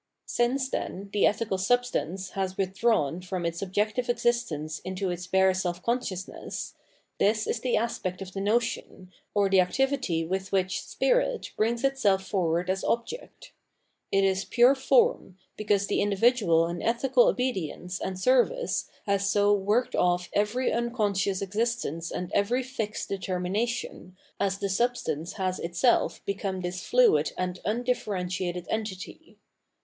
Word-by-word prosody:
* - - -58
Since, 260 +2 0
then, 195 +2 -4
the 205 - +4
ethical 205 -2 -1
substance 195 -4 0
has 190 -1 -3
withdrawn 190 -5 +1
from 180 -1 -4
its 170 0 -2
objective 210 +6 -1
existence 205 -11 0
into 185 0 -3
its 175 0 -5
bare 190 0 +4
self 180 -1 -3
conscious 230 -6 -1
ness, - - -7 0.5
this 215 +1 +2
is 235 - -1
the 245 +1 +1
aspect 210 -5 -2
of 190 -1 -8
the 195 - -3
notion, 210 -3 -1 0.2
or 200 -1 +4
the 195 -1 +4
activity 200 -4 0
with 190 +2 -3
which 185 -1 0
spirit - - 0
brings 230 +3 0
itself 210 -9 +2
forward 175 -3 0
as 190 +1 -1
object. 240 - -3 0.6
It 195 0 +3
is 190 0 +2
pure 245 +2 +5
form, 360 - +2 0.2
because 205 -2 +1
the 205 - 0
individual 205 -5 +3
in 170 +1 -4
ethical 270 - +3
obedience 190 - -2
and 185 -1 -3
service 260 - +2 0.2
has 200 -1 +1
so 205 0 +4
worked 210 +5 +1
off 180 0 +1
every 210 +5 +1
unconscious 205 -5 0
existence 200 -5 -2
and 180 0 -5
every 240 +6 +1
fixed 225 -5 -4
determination, 190 0 -3 0.2
as 195 -1 0
the 200 - -2
sub 240 +6 +1
stance 160 +2 -4
has 185 -2 -2
itself 175 +9 +1
become 195 -1 -3
this 180 0 -4
fluid 200 -12 +4
and 180 0 -2
undifferentiated 185 -6 -2
entity. 220 - -5
200 Hz, 145 wpm, -27 LUFS, 185-235 Hz, 0.6 s, pure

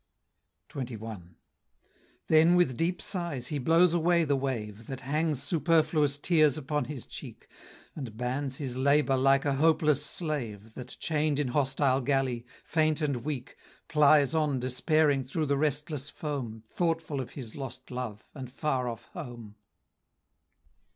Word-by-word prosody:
XXI. 110 -9 -7 0.9
Then 160 +2 +5
with 175 -8 +3
deep 170 +7 0
sighs 170 -10 -3
he 150 - -2
blows 165 +5 +4
away 170 0 +3
the 145 -3 +1
wave, 115 -5 -4
That 135 -1 -6
hangs 150 0 0
superfluous 155 -2 +2
tears 155 -2 +3
upon 150 0 -2
his 145 -5 -7
cheek, - - -9 0.5
And 125 -8 -7
bans 130 +2 -2
his 130 -3 -4
labor 140 0 +3
like 135 +1 +3
a 140 - +2
hopeless 155 -1 +3
slave, 115 - -4
That, 125 +1 -8
chain'd 150 -2 0
in 145 -3 0
hostile 135 0 +1
galley, 130 -3 0 0.2
faint 155 -1 +1
and 145 -4 0
weak, 125 0 -5 0.3
Plies 150 -2 +5
on 150 -4 +1
despairing 140 +3 +2
through 155 +5 -2
the 140 -1 +1
restless 150 -1 0
foam, 125 -8 -5
Thoughtful 165 -4 -1
of 125 - -8
his 120 -6 -8
lost 130 -2 -8
love, 125 -4 -5
and 130 -4 -8
far 130 -3 -1
off 115 - -7
home. 120 - -8
140 Hz, 140 wpm, -29 LUFS, 125-155 Hz, 0.9 s, Then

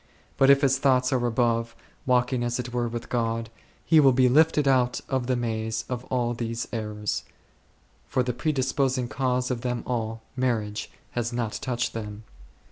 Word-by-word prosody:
But 135 - +4
if 140 0 +7
his 135 -1 +3
thoughts 130 -1 +3
are 125 -2 +1
above, 115 -1 0 0.3
walking 125 0 +2
as 120 0 -1
it 120 -1 -5
were 120 -1 0
with 115 0 -5
God, 115 -1 -1 0.3
he 160 - +6
will 135 -3 +6
be 130 0 +4
lifted 150 +2 +4
out 125 -2 +3
of 130 -2 -1
the 130 - +2
maze 110 -2 -2
of 125 0 -4
all 120 -2 0
these 115 0 -3
errors, 105 -2 -3 0.8
for, 130 - +1
the 125 0 -2
predisposing 130 -1 0
cause 125 0 -1
of 120 -2 -2
them 125 -1 -2
all, 115 -2 -3
marriage, 110 -5 -1 0.2
has 120 0 -2
not 120 -3 -2
touched 125 -1 -2
him. 105 -1 -6
120 Hz, 170 wpm, -26 LUFS, 115-130 Hz, 0.8 s, if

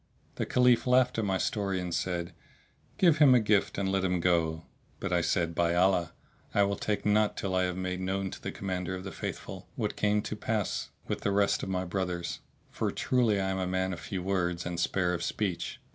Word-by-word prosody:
The - - -2
Caliph 125 -1 +4
laughed 125 -1 +4
at 110 - 0
my 95 -1 +1
story 100 -2 -1
and 90 -1 -4
said, 85 0 -2 0.6
"Give 170 -5 +4
him 140 -4 +8
a - - +6
gift 105 -2 +2
and 95 -1 0
let 95 0 +1
him 90 -1 +1
go;" 85 -2 +1 0.3
but - - -2
I - - +3
said, 85 -1 0
"By 85 +1 +1
Allah! 90 -2 +2 0.4
I 100 - +5
will 100 0 +1
take 105 0 -2
naught 105 0 +3
till 95 -2 -2
I 95 0 +2
have 90 0 -3
made 90 0 -3
known 95 0 -2
to - - -9
the - - -4
Commander 95 -1 -3
of 95 - -7
the 95 - -6
Faithful - - -6
what - - -2
came 105 0 +1
to - - -4
pass 105 -1 -2 0.2
with - - -3
the - - 0
rest 100 0 +2
of - - -4
my 95 0 -1
brothers; 90 -1 -3 0.3
for - - -1
truly 120 -6 +1
I 95 0 0
am 95 - -2
a 95 - -1
man 95 0 0
of 85 - -6
few 90 +3 -4
words 90 -2 -1
and 85 0 -3
spare 90 0 +1
of 85 - -2
speech." 95 0 -2
95 Hz, 220 wpm, -29 LUFS, 90-105 Hz, 0.6 s, him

